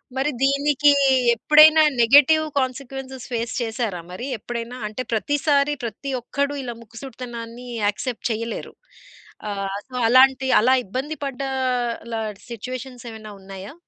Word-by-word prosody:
మరి 270 +2 0
దీనికి 280 +1 +3 0.5
ఎప్పుడైనా 305 +5 +7 0.2
నెగెటివ్ 290 +6 +6 0.2
కాన్సీక్వెన్సెస్ 265 0 -5
ఫేస్ 230 -1 -2
చేసారా 225 -5 -3
మరి 185 +7 -6
ఎప్పుడైనా? 235 +2 -6
అంటే 215 +4 -5
ప్రతిసారి 290 +5 +1
ప్రతి 235 +5 -5
ఒక్కడు 280 +4 -2
ఇలా 245 -2 -5
ముక్కుసూటితనాన్ని 235 0 -9 0.2
యాక్సెప్ట్ 220 +4 -2
చేయలేరు. 230 +1 -4 0.8
ఆహ్, 195 -1 -3
సో, 255 - -10
అలాంటి 265 +2 +5
అలా 255 +4 +4
ఇబ్బంది 265 +10 -4
పడ్డ 275 -1 -5 0.7
లా 225 - -1 0.3
సిట్యుయేషన్స్ 250 +2 -7
ఏమైనా 215 -1 -10
ఉన్నాయా? 195 +3 -9
250 Hz, 115 wpm, -22 LUFS, 225-275 Hz, 0.8 s, ఎప్పుడైనా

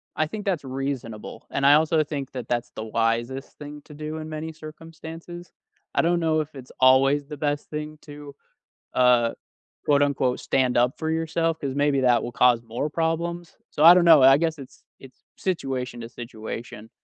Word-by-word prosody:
I 155 - +1
think 210 +5 -7
that's 180 -7 -1
reasonable. 130 -5 -5
And 140 - -2
I 145 +1 +8
also 155 0 +3
think 145 -3 -5
that 125 -3 -6
that's 120 -1 -2
the 110 - -5
wisest 115 +4 -2
thing 150 0 -9
to 150 - -13
do 155 +1 -6
in 155 0 -6
many 155 +1 -5
circumstances. 165 +2 -10 0.4
I - - +4
don't 170 +1 +1
know 160 -1 +1
if 150 -1 -9
it's 130 -1 -11
always 135 +2 +4
the 150 -1 -8
best 145 0 -2
thing 150 0 -6
to, 145 -1 -11 0.6
uh, 125 -2 +4 0.6
quote, 145 -1 +3
unquote, 130 -3 0
"stand 130 -2 +1
up 120 +2 +2
for 160 - -2
yourself," 165 0 -1
'cause 140 -3 -3
maybe 145 -1 +2
that 125 -2 +3
will 120 - -5
cause 120 -1 +3
more 120 +6 -3
problems. 170 +1 -2
So 150 - 0
I 170 +2 +11
don't 180 -1 +4
know, 160 -4 +8
I 135 +1 +8
guess 160 0 -1
it's 135 - -13 0.2
it's 135 -1 -16
situation 130 -9 -3
to 115 - -8
situation. 115 -2 -8
145 Hz, 185 wpm, -24 LUFS, 125-160 Hz, 0.6 s, I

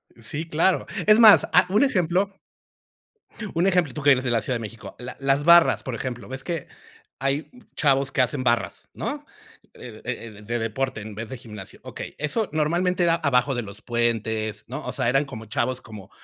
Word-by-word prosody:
Sí, 145 +8 -5
claro. 170 +4 +2 0.2
Es 215 +1 +6
más, 220 -3 +8
ah, 180 0 +6
un 210 +8 +3
ejemplo 195 - +1 1.2
un 170 +3 +2
ejemplo, 175 -7 +2
tú 150 - -5
que 145 0 +5
eres 130 -1 +3
de 120 - -1
la 115 - +2
Ciudad 130 - -2
de - - -2
México. 110 -2 -9
La 125 +1 -7
las 135 +1 +1
barras, 170 0 +6
por 130 - -5
ejemplo, 120 -2 -5
ves 130 +1 -7
que 170 -5 -4 0.5
hay 135 +3 -1 0.2
chavos 135 -3 +2
que - - +2
hacen 130 +1 -1
barras, 120 -1 -1
¿no? - - -5 0.5
Eh - - -11
eh, 110 -3 -6
de 120 +3 -2
deporte 115 +1 -2
en 110 +1 -8
vez 110 +2 -7
de 130 - -6
gimnasio. 105 -5 -11
Okey, - - -8
eso 155 +9 -1
normalmente 175 +4 +1
era 170 -1 +4
abajo 140 -4 +1
de 120 - -2
los 100 0 -10
puentes, 110 -3 -1
¿no? 130 - -6
O - - -3
sea, 130 -4 -1
eran 135 +4 +2
como 110 -5 -9
chavos, 125 +3 -2
como, 105 -4 -11
130 Hz, 195 wpm, -24 LUFS, 115-165 Hz, 1.2 s, más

